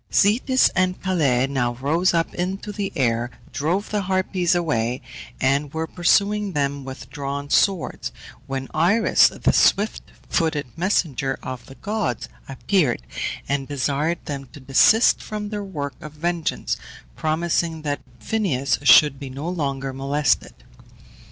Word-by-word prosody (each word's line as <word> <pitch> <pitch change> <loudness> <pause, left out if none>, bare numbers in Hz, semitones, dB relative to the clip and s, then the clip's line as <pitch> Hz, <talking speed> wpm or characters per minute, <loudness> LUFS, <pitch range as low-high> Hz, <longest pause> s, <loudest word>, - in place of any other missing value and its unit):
Zetes 250 +6 +4
and 185 0 +1
Calais 145 -10 +2
now 130 -3 -1
rose 155 +8 +1
up 165 -1 0
into 190 +4 -3
the 205 -1 -3
air, 120 -4 +1 0.2
drove 175 +8 -1
the 210 -1 0
Harpies 185 -1 +1
away, 125 -8 0 0.4
and 140 +2 +1
were 160 0 -1
pursuing 200 +4 +2
them 140 -1 -1
with 130 0 -9
drawn 140 0 -4
swords, 190 - +1 0.4
when 135 0 -4
Iris, 185 +9 +4
the - - 0
swift 210 +2 +3 0.3
footed 160 -5 0
messenger 150 -7 0
of 130 -2 -6
the 135 - -12
gods, 205 - -2 0.2
appeared, 145 - +1 0.4
and 140 -1 -1
desired 145 +4 -1
them 140 -2 -5
to 145 - -10
desist 140 - +4
from 210 -1 -5
their 205 -1 -4
work 145 -8 -5
of 150 -1 -9
vengeance, 170 +1 -2 0.4
promising 160 0 -1
that 145 -1 -2 0.2
Phineus 160 - 0
should 145 -1 +6
be 140 - -6
no 140 +5 -6
longer 140 -6 -2
molested. 135 +1 0
155 Hz, 135 wpm, -23 LUFS, 135-185 Hz, 0.4 s, should